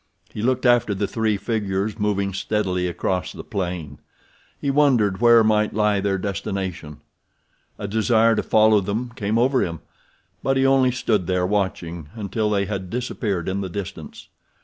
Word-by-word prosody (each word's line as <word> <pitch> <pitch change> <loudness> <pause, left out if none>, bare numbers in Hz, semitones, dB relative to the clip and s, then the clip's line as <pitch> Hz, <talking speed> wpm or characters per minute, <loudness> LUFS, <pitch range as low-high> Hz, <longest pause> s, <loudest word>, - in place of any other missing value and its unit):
He 105 - -5
looked 130 +2 0
after 120 -4 +3
the 100 +1 -1
three 110 -2 0
figures 105 -1 -2
moving 100 -2 0
steadily 95 -2 -1
across 90 +1 -2
the - - -9
plain. 90 -7 -4 0.6
He 140 - 0
wondered 120 -9 +2
where 120 -1 +7
might 105 -1 +2
lie 105 -2 +2
their 100 -1 0
destination. 95 -5 -4 0.8
A 100 - -5
desire 110 +2 +3
to - - +1
follow 110 -1 +4
them 110 +6 -3
came 105 0 -1
over 130 +2 +3
him, 85 -2 -4 0.6
but 135 0 +1
he 135 - +3
only 135 -1 +4
stood 110 -7 0
there 90 -1 +1
watching 90 -5 -2
until 105 0 -2
they 100 -1 +1
had 95 -2 -4
disappeared 105 -6 -3
in 95 +1 -1
the 95 - -4
distance. 95 -4 -7
105 Hz, 160 wpm, -22 LUFS, 95-115 Hz, 0.8 s, where